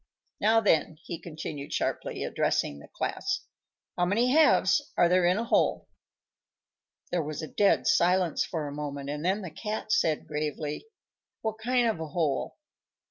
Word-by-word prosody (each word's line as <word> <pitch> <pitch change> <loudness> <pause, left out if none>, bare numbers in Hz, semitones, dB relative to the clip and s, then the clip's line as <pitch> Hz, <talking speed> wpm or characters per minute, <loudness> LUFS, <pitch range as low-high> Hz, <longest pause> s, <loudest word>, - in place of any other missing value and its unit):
Now, 225 +2 +4
then," 160 -6 +2
he 170 - -6
continued 150 -3 -7
sharply, - - -2
addressing - - 0
the - - -13
class, 390 0 -2 0.5
"how 175 - 0
many 230 +7 +2
halves 310 0 +5 0.2
are 175 - +5
there 180 0 +3
in 180 +2 +3
a 230 - 0
whole?" 235 - +1 1.2
There 175 - +1
was 155 +1 -5
a - - -4
dead 200 +4 +2
silence 180 -1 +3
for 155 -4 -4
a - - -5
moment, 145 -1 -5
and 150 +1 -4
then 195 +4 0
the 175 - -6
Cat 215 +5 -4
said 160 -7 +2
gravely, 150 - -4 0.6
"What 220 0 -2
kind 245 +1 +2
of 220 -7 -1
a 160 - -4
hole?" 150 -4 -1
175 Hz, 160 wpm, -28 LUFS, 150-215 Hz, 1.2 s, halves